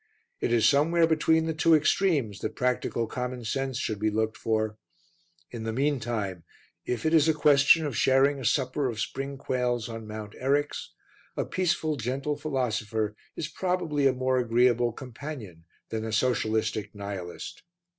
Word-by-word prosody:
It - - -1
is 115 -2 +4
somewhere 165 +4 +4
between 160 0 +2
the 160 - -1
two 160 +1 +4
extremes 150 - +2
that 110 - -4
practical 125 -2 0
commonsense 125 +1 -3
should 110 -4 -2
be 110 +1 +1
looked 110 +1 -1
for. 110 -1 -1 0.7
In 115 - -6
the 110 0 -2
meantime, 115 - -1 0.4
if 125 +1 -2
it 160 - +2
is 160 -1 +5
a 160 - +3
question 150 +1 +5
of 140 -5 -3
sharing 135 +3 +3
a 130 - -6
supper 130 +3 +1
of 110 -2 -5
spring 135 +4 -3
quails 125 -3 -1
on 115 -2 -7
Mount 105 -1 -7
Eryx, 145 +3 0 0.5
a - - 0
peaceful, 160 -4 0
gentle 135 +5 -2
philosopher 110 -7 -2 0.2
is 155 - -3
probably 165 -4 0
a - - +4
more 130 0 +1
agreeable 120 0 +3
companion 120 - -8 0.2
than 110 -1 -3
a 110 - -4
socialistic 110 -2 0
nihilist. 100 -3 -6
125 Hz, 155 wpm, -27 LUFS, 110-145 Hz, 0.7 s, is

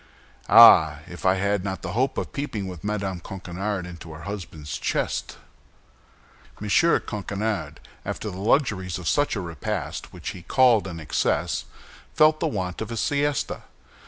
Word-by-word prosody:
Ah! 80 -1 +8
if 85 +2 -4
I 95 - +5
had 100 0 0
not 95 -1 -4
the - - -4
hope 130 +3 0
of - - -3
peeping 115 -9 -3
with 90 -4 -8
Madame 100 -3 -2
Coquenard 95 +2 -4
into 85 -2 -10
her 75 - -10
husband's 85 -7 -6
chest!" - - -2 1.2
M. 105 - -5 0.3
Coquenard, 105 -1 -3 0.2
after 105 - -4
the 90 - -8
luxuries 100 - +1
of 90 -2 -6
such 145 -3 +2
a 100 - -2
repast, 85 -4 -4
which - - -6
he 90 - -8
called 120 +1 +4
an 85 -3 -6
excess, 80 - -1 0.5
felt 155 0 +5
the - - 0
want 90 -3 -3
of 110 - -4
a 115 - -4
siesta. 145 +3 0
95 Hz, 155 wpm, -24 LUFS, 90-110 Hz, 1.2 s, Ah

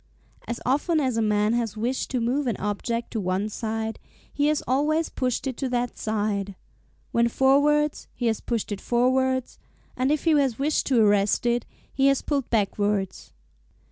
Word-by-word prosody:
As 235 - -3
often 295 +6 +2
as 260 -5 0
a 225 - +1
man 210 0 +2
has 230 -3 -1
wished 245 +4 -2
to 255 - -1
move 255 +4 0
an 230 - -1
object 230 +3 -3
to 225 - -2
one 190 +2 -1
side, 220 0 -3 0.3
he 290 0 +1
has 305 0 +1
always 305 +5 +1
pushed 255 0 -2
it 260 -3 -3
to 270 - -2
that 245 -1 -1
side 205 -2 -2 0.6
when 235 0 +3
forwards, 285 +4 +2
he 245 - -3
has 225 -2 +1
pushed 230 -3 -3
it 200 - -4
forwards; 260 +1 +1 0.4
and 260 +2 +1
if 300 - 0
he 330 - +3
has 275 -6 +2
wished 295 +3 0
to 255 -4 +3
arrest 205 +2 +2
it, 240 0 +1 0.3
he 270 0 +3
has 275 -1 +2
pulled 280 -4 -1
backwards. 205 -2 -1
240 Hz, 175 wpm, -25 LUFS, 215-270 Hz, 0.6 s, when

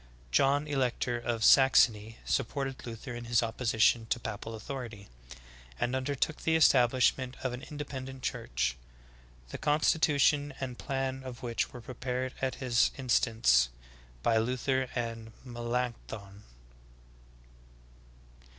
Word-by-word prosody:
John, 140 - +3
Elector 125 -3 0
of 120 -2 -2
Saxony, 115 -5 +5
supported 135 0 -2
Luther 115 +1 -7
in 120 0 -7
his 120 0 +2
opposition 115 0 +2
to 120 - 0
papal 115 0 -6
authority, 115 -3 -7 0.7
and 125 +2 0
undertook 140 +3 -1
the 160 - +2
establishment 130 -3 +3
of 130 -2 -1
an 125 - -6
independent 135 -3 -7
church, - - -1 0.7
the - - -7
constitution 145 -2 +2
and 125 -2 -5
plan 135 -1 -2
of 125 -2 -8
which 120 -1 -1
were 125 - -9
prepared 125 +1 -4
at 130 -1 -1
his 125 -3 +2
in 130 -2 -8
stance 65 - +4 0.5
by 115 - +3
Luther 130 +2 0
and 115 -2 -4
Melancthon. 120 -4 -4
125 Hz, 115 wpm, -30 LUFS, 115-135 Hz, 0.7 s, Saxony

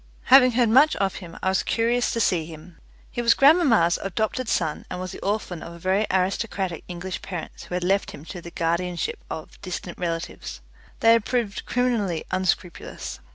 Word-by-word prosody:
Having 255 -2 +8
heard 235 -1 +3
much 275 +7 +6
of 195 -1 -1
him, 175 -3 -10
I 190 - +2
was 190 - +2
curious 235 +2 +1
to 230 - -1
see 170 -7 +1
him. 165 +1 -12 0.3
He 240 - -2
was 235 -1 +5
grandmamma's 275 - +5
adopted 220 +5 -2
son, 160 -3 0
and 180 - -5
was 185 0 -5
the - - -8
orphan 195 -5 -2
of 170 0 -9
very 190 +4 +1
aristocratic 190 -1 -1
English 180 -1 -5
parents 175 -4 -7
who 180 - -5
had 180 - -1
left 195 +3 +1
him 145 - -10
to 175 +1 -8
the 170 - -9
guardianship 170 +1 -2
of 155 - -8
distant 180 -2 -6
relatives. 170 0 -4 0.4
They 225 - +6
had 230 -2 +3
proved 235 -6 -2
criminally 230 -9 0
unscrupulous. 185 -2 -2
190 Hz, 180 wpm, -24 LUFS, 175-230 Hz, 0.4 s, Having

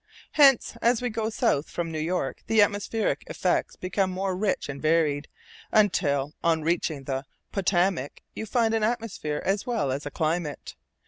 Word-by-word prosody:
Hence, 275 -5 +5
as 235 0 +3
we 245 -1 -2
go 220 0 -1
south 220 - +1
from 170 -1 -3
New 160 - -3
York, 175 +4 -2
the 220 -2 +5
atmospheric 205 +2 -1
effects - - 0
become 185 +1 -1
more 190 0 -2
rich 195 +1 -1
and 140 -1 -6
varied, 155 -2 +2 0.4
until 150 -9 +2
on 165 -2 +2
reaching 160 -3 0
the 135 0 -3 0.3
Potomac 180 -6 0
you 220 - -5
find 225 0 +2
an 225 -1 +1
atmosphere 220 -10 -2
as 195 +4 0
well 150 - 0
as 140 +2 -3
a - - -3
climate. 155 0 -2
180 Hz, 165 wpm, -26 LUFS, 150-215 Hz, 0.4 s, Hence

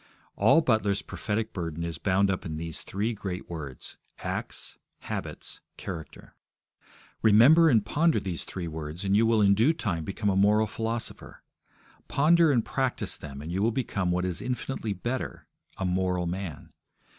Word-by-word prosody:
All 165 - +5
Butler's 110 -8 +1
prophetic 110 0 -3
burden 85 -2 -4
is 85 -1 -4
bound 95 0 +2
up 95 - -3
in 80 -5 -4
these 80 0 -4
three 105 +5 -2
great 95 -4 -5
words 75 -7 -7 0.2
acts, - - -5 0.2
habits, - - -6 0.2
character. 85 -5 -8 0.9
Remember 130 +10 +7
and 110 -7 +3
ponder 160 +8 +2
these 90 -4 -3
three 90 -3 -5
words, 80 +2 -5
and 100 0 +2
you 115 +2 +4
will 110 -2 +4
in 100 0 +6
due 115 +10 +4
time 95 - -2
become 100 +4 -1
a - - 0
moral 105 +3 +4
philosopher. 115 +1 -4 0.6
Ponder 160 +3 +4
and 120 -5 +2
practise 130 -3 -1
them, 70 -1 -8
and 80 - -6
you 95 +3 -1
will 110 - +3
become 110 -6 -1
what 90 +1 +1
is 90 -1 -3
infinitely 125 -3 -3
better 120 +7 -4 0.3
a 95 - -2
moral 90 -1 0
man. 90 -3 -5
100 Hz, 160 wpm, -28 LUFS, 90-115 Hz, 0.9 s, Remember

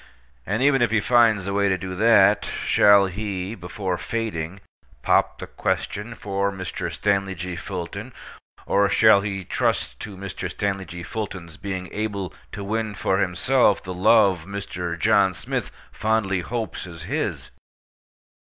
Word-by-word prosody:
And, 110 +6 0
even 135 -2 +4
if 120 - +3
he 110 0 +2
finds 115 -4 +4
the 100 - -2
way 100 0 +2
to 95 - +1
do 95 +1 -6
that, 105 0 +5 0.2
shall 100 -1 +6
he, 95 0 -4
before 90 -1 -4
fading, 100 -6 -3 0.4
pop - - +2
the - - -6
question 110 +3 -3
for 100 -1 -1
Mr. 95 -3 -5
Stanley 100 -2 0
G. 90 +1 -5
Fulton, 90 0 -6 0.5
or 100 0 +3
shall 100 0 +6
he 100 -2 -4
trust - - -1
to 100 -2 -7
Mr. 95 -2 -5
Stanley 95 -2 -2
G. 85 +1 -8
Fulton's 90 -5 -6
being 95 -2 -4
able 100 -4 -3 0.2
to 100 - -6
win 110 +1 -2
for 95 0 0
himself 100 +4 +2
the 90 - -5
love 95 -2 +4
Mr. 90 -4 -4
John 95 +2 +3
Smith - - -3 0.2
fondly 110 -4 0
hopes 110 0 -4
is 85 -2 -9
his? - - -3
100 Hz, 150 wpm, -23 LUFS, 90-105 Hz, 0.5 s, shall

